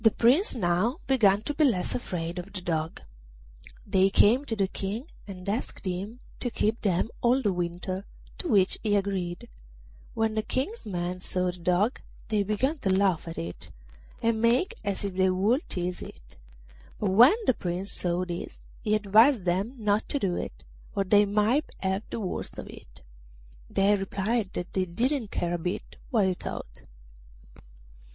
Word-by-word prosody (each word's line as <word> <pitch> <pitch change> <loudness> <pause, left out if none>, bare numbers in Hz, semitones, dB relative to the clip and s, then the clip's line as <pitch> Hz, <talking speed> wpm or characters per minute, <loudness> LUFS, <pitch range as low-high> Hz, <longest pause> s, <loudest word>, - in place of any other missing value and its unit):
The 225 - +8
Prince 255 - +3
now 195 - +1
began 215 -6 +4
to 295 - -2
be 305 - +2
less 215 -11 +2
afraid 175 -6 -3
of 185 +3 -8
the 185 - -5
Dog. 160 -2 -2 0.8
They 195 -1 +3
came 235 +8 +4
to 225 - -2
the 195 -3 +1
King 200 +6 -4 0.2
and 185 -2 -9
asked 210 +1 -3
him 195 +6 -4 0.2
to 245 - -2
keep 220 0 0
them 190 +1 +1
all 245 +2 +4
the 205 -3 +2
winter, 180 +2 -3 0.3
to 360 - -3
which 195 - +3
he 210 -2 +1
agreed. 190 -3 -2 0.7
When 225 0 +1
the 215 - +1
King's 265 - -3
men 180 -1 -3
saw 180 -1 -1
the 180 - -13
Dog 180 +8 +1 0.3
they 215 -2 +2
began 235 +10 0
to 195 - -1
laugh 190 -3 +2
at 165 - -6
it, 85 +1 -6 0.5
and 225 -1 +2
make 240 +10 +3
as 200 -1 -2
if 200 - -3
they 190 0 +3
would 205 - +1
tease 180 0 -2
it; - - -11 0.6
but 205 -3 0
when 240 - +8
the - - +4
Prince 180 0 -3
saw 175 0 -1
this 175 -1 -6 0.2
he 215 0 +2
advised 215 +2 +5
them 190 +8 0
not 210 -1 0
to - - 0
do 190 -9 0
it, - - -5 0.3
or 195 - +2
they 205 +2 +5
might 215 +8 +2
have 190 +1 0
the - - -4
worst 190 -4 -4
of - - -6
it. - - -13 0.7
They 195 +1 +3
replied 195 +2 -1
that 175 - -5
they 190 -1 +1
didn't 235 - -1
care 175 -2 -1
a 175 - -1
bit 180 +3 -4
what 220 -5 +3
he 190 - +2
thought. - - -7
200 Hz, 175 wpm, -28 LUFS, 180-225 Hz, 0.8 s, The